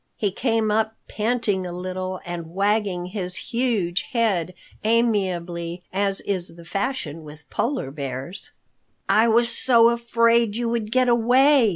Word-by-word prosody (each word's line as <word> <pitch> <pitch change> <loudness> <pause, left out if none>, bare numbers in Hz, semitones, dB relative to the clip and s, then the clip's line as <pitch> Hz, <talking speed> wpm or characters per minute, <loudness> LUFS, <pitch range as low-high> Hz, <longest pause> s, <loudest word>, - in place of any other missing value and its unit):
He 205 -3 0
came 225 0 0
up 220 +1 +1
panting 215 -4 -1
a - - -6
little 185 +1 -4
and 175 -2 -5
wagging 200 -3 +1
his 180 -1 -4
huge 225 -8 -1
head 190 -7 +1 0.3
amiably 180 -7 0
as 195 0 0
is 185 -4 -2
the 170 -1 -13
fashion 185 - -3
with 150 0 -13
Polar 245 - -1
Bears. 140 +5 -5 0.6
"I 220 +2 +4
was 235 +1 +3
so 235 -2 +5
afraid 235 -2 +2
you 235 0 -1
would 225 -2 -2
get 255 +1 +3
away!" 245 +2 +5
210 Hz, 140 wpm, -23 LUFS, 180-235 Hz, 0.6 s, so